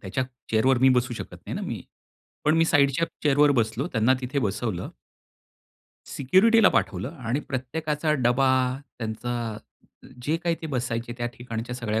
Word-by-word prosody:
त्याच्या 105 Hz, +7 st, -2 dB, 0.3 s
चेअरवर 120 Hz, +4 st, +3 dB
मी 130 Hz, +2 st, +5 dB
बसू 125 Hz, 0 st, 0 dB
शकत -, -, -7 dB
नाही -, -, -4 dB
ना -, -, -4 dB
मी, -, -, -4 dB, 0.6 s
पण 155 Hz, -, +4 dB
मी 165 Hz, -, +5 dB
साइडच्या 145 Hz, 0 st, +3 dB, 0.2 s
चेअरवर 145 Hz, 0 st, +4 dB
बसलो, 120 Hz, +2 st, 0 dB
त्यांना 115 Hz, +2 st, +3 dB
तिथे 130 Hz, +2 st, -2 dB
बसवलं. 105 Hz, -5 st, -2 dB, 1.2 s
सिक्युरिटीला 200 Hz, -, +4 dB
पाठवलं 100 Hz, -1 st, 0 dB
आणि 125 Hz, +3 st, -1 dB
प्रत्येकाचा 150 Hz, +4 st, -1 dB
डबा, 130 Hz, +2 st, +4 dB, 0.5 s
त्यांचा 115 Hz, 0 st, -3 dB, 0.7 s
जे 155 Hz, +5 st, 0 dB
काही 170 Hz, 0 st, 0 dB
ते -, -, -3 dB
बसायचे 120 Hz, -4 st, -3 dB
त्या 120 Hz, -, -1 dB
ठिकाणच्या 120 Hz, 0 st, -5 dB
सगळ्या 110 Hz, -3 st, -1 dB
125 Hz, 145 wpm, -25 LUFS, 115-145 Hz, 1.2 s, मी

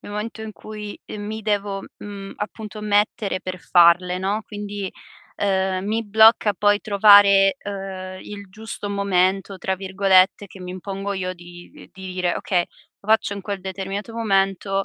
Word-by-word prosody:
nel -, -, -10 dB
momento 220 Hz, +2 st, -5 dB
in 220 Hz, 0 st, -6 dB
cui, 210 Hz, -1 st, -8 dB
ehm, 210 Hz, -, -8 dB
mi 215 Hz, +1 st, -5 dB
devo, 200 Hz, -2 st, -1 dB, 0.2 s
mhmm, 200 Hz, -1 st, -8 dB
appunto 215 Hz, 0 st, -7 dB
mettere 205 Hz, -1 st, 0 dB
per 185 Hz, 0 st, -5 dB
farle, 175 Hz, +1 st, +4 dB
no, 195 Hz, +3 st, -1 dB
quindi, 205 Hz, -2 st, -5 dB, 0.5 s
ehm, 190 Hz, -1 st, 0 dB
mi 220 Hz, +2 st, 0 dB
blocca 220 Hz, 0 st, +5 dB
poi 205 Hz, +1 st, +2 dB
trovare, 200 Hz, 0 st, +6 dB
ehm, 190 Hz, -3 st, -7 dB
"il 200 Hz, -2 st, -9 dB
giusto 215 Hz, +1 st, -7 dB
momento" 195 Hz, -1 st, 0 dB
tra 190 Hz, -, -1 dB
virgolette, 190 Hz, +1 st, +3 dB
che 190 Hz, 0 st, -14 dB
mi 180 Hz, 0 st, -7 dB
impongo 195 Hz, +2 st, -5 dB
io 185 Hz, -1 st, -3 dB
di 175 Hz, 0 st, -13 dB
uhm, -, -, -13 dB
di 190 Hz, -1 st, -8 dB
dire: 180 Hz, -1 st, 0 dB
"Okay, 180 Hz, -3 st, 0 dB, 0.4 s
lo 200 Hz, -, -17 dB
faccio 220 Hz, -2 st, +2 dB
in 200 Hz, -, -7 dB
quel 200 Hz, -1 st, -4 dB
determinato 195 Hz, +4 st, -5 dB
momento" 195 Hz, -2 st, 0 dB
200 Hz, 160 wpm, -22 LUFS, 190-205 Hz, 0.5 s, trovare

